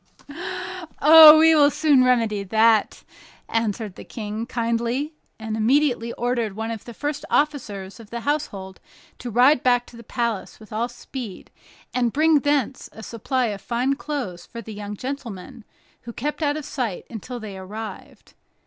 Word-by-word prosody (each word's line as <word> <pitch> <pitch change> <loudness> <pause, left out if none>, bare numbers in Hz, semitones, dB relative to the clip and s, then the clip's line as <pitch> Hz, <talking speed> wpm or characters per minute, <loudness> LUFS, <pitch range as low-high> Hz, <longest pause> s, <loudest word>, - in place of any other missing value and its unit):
"Oh, 310 +1 +10
we 320 +1 +6
will 290 -2 +6
soon 295 -3 +3
remedy 230 -5 +2
that," 220 +2 +2 0.4
answered 220 -2 -2
the - - -11
King, 215 +1 -6
kindly 235 +5 -1 0.2
and 220 -1 -4
immediately 240 +1 +2
ordered 235 -4 -2
one 225 +1 -3
of 225 -2 -7
the 235 - -9
first 295 0 -3
officers 235 -10 -1
of 220 -3 -13
the 235 0 -5
household 200 -10 -3 0.4
to 245 - -6
ride 250 +4 +4
back 245 -1 +2
to - - -16
the 235 - -11
palace 235 -3 -3
with 215 -1 -13
all 230 +3 -1
speed, 240 -4 -9 0.4
and 245 -2 +1
bring 310 +1 +4
thence 280 -2 -1
a 220 - -11
supply 245 +4 -2
of 195 - -9
fine 250 +5 0
clothes 265 -12 -5
for 235 - -10
the 220 -1 -8
young 205 0 -7
gentleman, 240 -5 -7 0.4
who 235 - -9
kept 295 +7 -4
out 295 -1 +1
of 305 - -6
sight 235 -9 -4
until 240 +3 -7
they 210 -3 -8
arrived. 210 +4 -9
235 Hz, 160 wpm, -23 LUFS, 220-275 Hz, 0.4 s, Oh